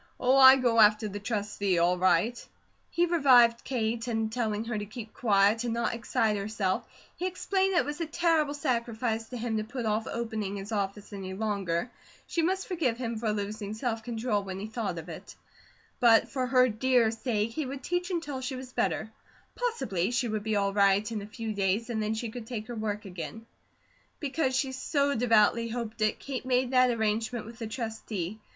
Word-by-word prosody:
Oh, 255 +1 +3
I 265 0 +10
go 245 -3 +2
after 215 0 +5
the 205 0 -5
Trustee, 205 -3 -1
all 175 +1 +3
right!" 195 +6 +2 0.5
He 345 - +2
revived 255 -9 +5
Kate, 230 -2 -2
and 225 -2 -1
telling 220 -3 -1
her 235 -1 -3
to 210 -1 -3
keep 220 +1 -9
quiet, 210 0 +3
and 235 -1 -1
not 235 -1 0
excite 225 -2 0
herself, 200 -2 -2 0.3
he 365 - -2
explained 380 +1 0
that - - +5
it - - -5
was 295 +3 -4
a 330 - -1
terrible 320 -3 +1
sacrifice 235 -4 -1
to 250 - -6
him 230 -1 -2
to 215 - -1
put 240 +2 -5
off 215 +1 0
opening 220 -4 -3
his 200 +2 -7
office 205 0 -3
any 190 -1 -6
longer; 200 -1 -1 0.3
she 335 - -1
must 375 +3 0
forgive 320 - 0
him 235 -3 -3
for 220 -1 0
losing 210 0 -4
self 225 0 -2
control 225 -2 -1
when 190 -1 -6
he 200 - -4
thought 220 -5 -3
of 165 0 -7
it; 165 - -9 0.6
but 230 -2 +5
for 260 -2 -2
her 255 0 +5
dear 240 0 +2
sake 225 -1 -1
he 295 +3 -3
would 270 0 -6
teach 355 +3 -1
until 325 -7 -3
she 260 +1 -3
was 255 0 -9
better 220 0 -1 0.4
possibly 445 - -1
she 245 0 0
would 215 -1 -2
be 220 0 -1
all 200 -1 +1
right 200 +2 +3
in 215 -2 -3
a 200 - -8
few 220 0 -5
days, 200 +4 0
and 220 -2 -1
then 215 +1 -1
she 225 0 -4
could 230 -1 -8
take 225 -3 -5
her 240 - -7
work 210 -1 -3
again. 185 +4 -7 0.7
Because 275 -2 -1
she 265 0 0
so 280 +2 0
devoutly 230 -1 +3
hoped 225 -2 -5
it, 215 0 +2
Kate 270 -2 -5
made 255 0 +1
that 255 -1 +5
arrangement 220 0 -1
with 230 +1 -11
the 225 - -4
Trustee. 220 -4 -4
225 Hz, 200 wpm, -29 LUFS, 210-255 Hz, 0.7 s, I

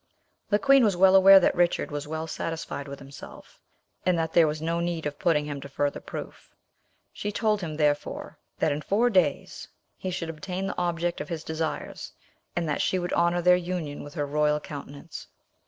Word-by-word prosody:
The 205 - +4
queen 275 +3 +5
was 200 -5 +2
well 190 +1 +6
aware 195 0 +9
that - - +2
Richard 175 -3 +1
was 145 0 -4
well 160 +1 -3
satisfied 160 -3 -5
with 140 0 -7
himself, 140 0 -12 0.4
and 180 -2 +2
that 160 -1 -1
there 165 -2 +6
was 150 0 -2
no 165 +2 -1
need 170 -2 -2
of 145 -1 -4
putting 150 -4 +2
him 145 -2 -5
to 140 - -9
further 145 +1 -1
proof; - - -9 0.6
she 205 - -4
told 210 -1 +1
him, 160 -4 -4
therefore, 150 -1 -1 0.2
that 160 - +1
in 145 +1 -2
four 220 +10 +2
days 175 -8 0 0.3
he 185 - -4
should 170 -2 -3
obtain 180 +5 -5
the 195 - -4
object 175 -1 -1
of 150 - -7
his 165 -2 -4
desires, 160 0 -4 0.4
and 170 -1 -1
that 150 - 0
she 185 - +1
would 175 -1 -3
honour 170 0 +2
their 180 +1 +6
union 175 -5 -4
with 145 +3 -11
her 145 -3 -1
royal 150 +1 +1
countenance. 145 +1 -9
165 Hz, 195 wpm, -26 LUFS, 150-180 Hz, 0.6 s, aware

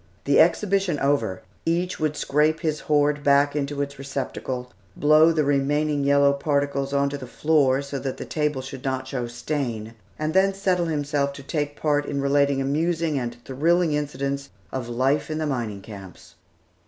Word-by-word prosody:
The - - +3
exhibition 195 -6 +3
over, 140 -10 0 0.2
each 175 +2 -1
would 155 -1 -1
scrape 155 +2 +1
his 155 -2 -1
hoard 145 -1 +1
back 145 +1 +4
into 145 0 -1
its 140 -1 -8
receptacle, 130 -3 -4 0.2
blow 155 +2 +6
the 155 -2 +1
remaining 145 +1 +1
yellow 140 0 +4
particles 140 -1 -1
on 140 0 +2
to 140 0 -5
the 130 - -8
floor 140 -1 +2
so 140 0 -5
that 135 -1 -4
the - - -6
table 150 -4 -1
should 135 0 -8
not 130 -1 -2
show 125 -2 -3
stain, 120 -3 -4 0.2
and 155 +1 -2
then 195 +1 +3
settle 185 -3 +1
himself 145 -2 -1
to 140 - -10
take 145 0 -2
his - - -22
part 145 -1 +1
in 140 - -2
relating 140 0 +2
amusing 155 +2 0
and 120 -1 -4
thrilling 160 +5 +2
incidents 140 -1 -2 0.2
of 125 -3 -4
life 135 +5 +1
in 155 - -2
the 155 - -1
mining 115 -8 -3
camps. 95 -5 -11
140 Hz, 175 wpm, -24 LUFS, 135-155 Hz, 0.2 s, blow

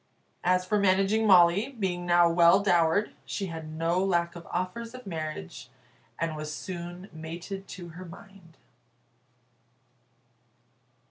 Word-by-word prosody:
As 180 0 +2
for 210 +2 +1
Managing 200 +3 +3
Molly, 190 +7 +5
being 180 -4 -2
now 175 0 +5
well 170 +2 +5
dowered, 175 +1 +3
she 195 - -4
had 160 -1 -7
no 165 +3 0
lack 175 -2 0
of 170 - -10
offers 225 +7 -4
of 255 - -11
marriage, 155 - -6 0.5
and 165 -1 -2
was 155 0 -5
soon 175 +2 -7
mated 170 +5 -7
to 175 -2 -9
her 180 +3 -10
mind. 180 -1 -14
175 Hz, 125 wpm, -28 LUFS, 165-195 Hz, 0.5 s, Molly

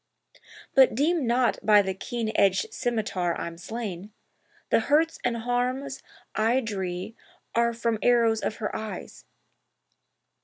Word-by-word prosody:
But 265 -4 +6
deem 300 +1 +1
not 245 +1 +2
by 210 -1 +6
the 190 0 -2
keen 225 +3 -3
edged 195 -2 +2
scymitar 205 -7 -1
I'm 170 - -5
slain— 205 -2 -6 0.6
The - - +5
hurts 310 +7 +2
and 240 -1 0
harms 250 +3 -2 0.3
I 225 +4 +2
dree 190 -3 -4 0.4
are 235 0 +3
from 230 -1 -1
arrows 230 -2 +3
of 220 - -2
her 215 -3 -4
eyes. 220 -1 -7
230 Hz, 125 wpm, -26 LUFS, 210-245 Hz, 0.6 s, But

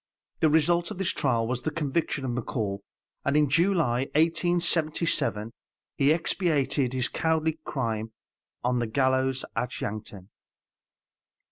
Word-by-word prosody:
The 160 - +4
result 170 +3 +3
of 210 - -6
this 190 -1 0
trial 120 -5 +1
was 125 +1 -2
the - - -1
conviction 145 -2 -1
of 125 - -1
McCall, 110 -4 -2 0.4
and 140 +1 +2
in 150 -1 +4
July, 165 -6 +2
1877, 165 -8 +1 0.4
he 140 +1 +4
expiated 150 -6 +1
his 130 -2 +1
cowardly 160 -1 0
crime 115 -4 -2 0.5
on 125 0 +1
the 120 - -1
gallows 130 +2 +1
at 125 +2 -2
Yankton. 100 -2 -6
140 Hz, 125 wpm, -27 LUFS, 120-160 Hz, 0.5 s, The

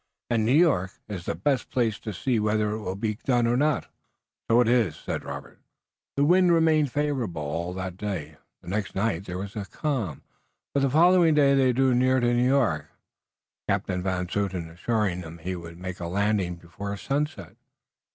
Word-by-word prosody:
"And 110 -2 +2
New - - +3
York 140 - +3
is 95 -4 -6
the - - -2
best 130 - 0
place 115 -4 0
to 110 - -5
see 115 +5 0
whether 105 0 +1
it 110 - -3
will 95 -3 -4
be 105 +2 -2
done 120 -3 +2
or 120 +1 +2
not." 145 +1 +1 0.6
"So 115 +1 +5
it 120 - +4
is." 115 -10 +1
The - - -6 0.7
wind 180 +2 +5
remained 160 -4 +3
favorable 130 - -1
all 85 +4 -3
that 95 -1 -5
day, 85 -8 -4 0.3
the - - -17
next 100 +1 -3
night 95 -2 0
there 90 -2 -5
was 100 +1 -6
a 105 -2 -4
calm, 115 - -3 0.5
but 140 - +2
the 135 0 +2
following 170 +2 +5
day 140 -2 +5
they 135 -2 +4
drew 130 +1 +3
near 130 +1 +3
to 120 0 +2
New 120 +1 +3
York, 130 - +2 0.8
Captain 90 -1 0
Van 90 -1 -1
Zouten 90 -4 -2
assuring 95 0 -1
them 80 -1 -9
he 90 +3 -4
would 85 -1 -9
make 95 +1 -6
a 85 - -4
landing 100 -1 0
before 90 +4 -7
sunset. 135 - -3
105 Hz, 180 wpm, -26 LUFS, 90-130 Hz, 0.8 s, So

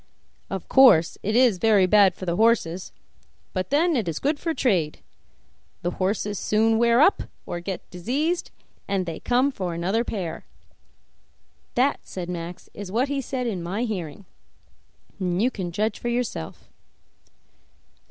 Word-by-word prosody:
Of 190 -2 -5
course 250 -12 +6
it 215 +3 -1
is 240 -6 +4
very 210 -3 +4
bad 195 -1 +5
for 185 - -7
the 170 -1 -1
horses, 190 -5 +1 0.6
but 185 -1 -2
then 315 +4 +2
it 225 -8 -1
is 160 -3 -2
good 290 +1 0
for 330 - -2
trade. 185 - 0 0.9
The 175 - 0
horses 200 +2 -2
soon 220 +1 +2
wear 235 0 +4
up, 375 +8 +5 0.2
or 175 - -4
get 185 +2 -6
diseased, 280 - -1 0.4
and 195 -2 0
they 165 -2 -5
come 255 +3 +2
for 180 -8 -4
another 190 +7 0
pair.' 175 -8 -5 1.3
That," 260 +4 +2
said 180 -2 -7
Max, 175 0 -6
"is 200 -2 -7
what 250 +6 +1
he 280 -1 -1
said 255 -1 -3
in 200 -7 -2
my 190 +7 -3
hearing, 190 -5 -5 0.9
and 180 -2 -1
you 245 +5 +2
can 180 -6 -5
judge 210 +4 -1
for - - -5
yourself." 235 - -4
205 Hz, 150 wpm, -24 LUFS, 180-245 Hz, 1.3 s, course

